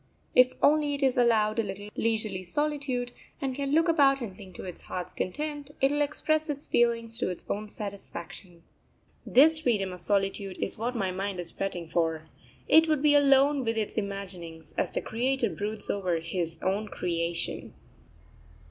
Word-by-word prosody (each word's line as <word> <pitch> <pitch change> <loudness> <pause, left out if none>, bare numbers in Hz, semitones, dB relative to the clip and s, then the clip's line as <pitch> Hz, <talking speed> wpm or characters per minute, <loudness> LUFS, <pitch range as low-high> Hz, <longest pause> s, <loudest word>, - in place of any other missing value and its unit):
If 255 0 +6
only 295 -1 +4
it 280 - -3
is 265 -2 +3
allowed 225 -3 +3
a - - +3
little 205 +1 -6
leisurely 215 -4 0
solitude, 270 +3 -1 0.3
and 270 -1 -2
can 275 +1 -3
look 325 +3 +4
about 280 -4 +4
and 220 -7 -6
think 190 -4 -12
to - - -8
its 180 -2 -8
heart's 180 -1 -6
content, 290 +7 -4
it 270 +1 +3
will 290 0 +1
express 310 +2 0
its 285 0 -3
feelings 230 -1 +2
to - - 0
its 180 - -6
own 210 +1 -3
satisfaction. 185 -4 -8 0.6
This 310 +5 +7
freedom 210 -10 0
of 180 - -9
solitude 195 -1 0
is - - -2
what 240 +3 -3
my 195 -5 -1
mind 190 0 -3
is 170 -1 -3
fretting 180 -4 -4
for; 160 -1 -1 0.4
it 320 +1 +6
would 305 -2 +1
be 295 -1 +5
alone 280 -1 +5
with 225 -1 -1
its 215 -2 -1
imaginings, 185 -6 -5
as - - 0
the - - -3
Creator 245 -1 0
broods 205 +5 -5
over 185 -4 0
His 165 0 -3
own 200 +3 0
creation. 170 -3 -3
220 Hz, 175 wpm, -28 LUFS, 185-275 Hz, 0.6 s, This